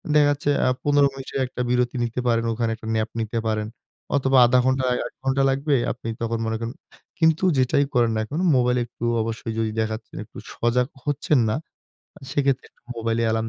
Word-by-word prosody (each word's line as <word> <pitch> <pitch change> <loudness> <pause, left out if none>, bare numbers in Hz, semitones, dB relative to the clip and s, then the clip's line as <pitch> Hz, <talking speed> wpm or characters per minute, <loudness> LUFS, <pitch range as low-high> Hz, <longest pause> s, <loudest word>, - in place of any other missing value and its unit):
দেখা 150 -1 +6
যাচ্ছে 145 0 -1 0.2
আ - - +3 0.2
১৫ 145 -1 +4
মিনিটের 135 0 -5
একটা 125 - -5
বিরতি 125 0 +1
নিতে 120 +1 -2
পারেন, 115 -1 +2
ওখানে 115 0 -1
একটা 110 0 -10
ন্যাপ 110 0 0
নিতে 115 +1 -2
পারেন। 110 -1 -1 0.5
অথবা 135 -1 +2
১/২ 125 +1 +4
ঘন্টা, 130 0 +2 0.2
১ - - -15
ঘন্টা 135 +1 +2
লাগবে। 140 +2 +1 0.2
আপনি 115 - -6
তখন 115 0 -1
মনে 110 - -1
করেন। 115 +2 -4 0.5
কিন্তু 160 +1 +3
যেটাই 130 +2 +3
করেন 120 -2 +3
না - - 0
এখন 145 +8 -4 0.2
মোবাইল 125 0 +3
একটু 120 0 -7 0.2
অবশ্যই 115 0 -4
যদি 110 -1 0
দেখা 110 0 0
যাচ্ছে 110 0 -13
যে - - -4
একটু - - -15 0.2
সজাগ 125 +2 +1 0.2
হচ্ছেন 145 0 +1
না। - - +1 0.6
আ - - -32
সেক্ষেত্রে 135 -1 0 0.3
মোবাইলে 115 0 0
এলার্ম 110 0 0
125 Hz, 195 wpm, -23 LUFS, 115-135 Hz, 0.6 s, দেখা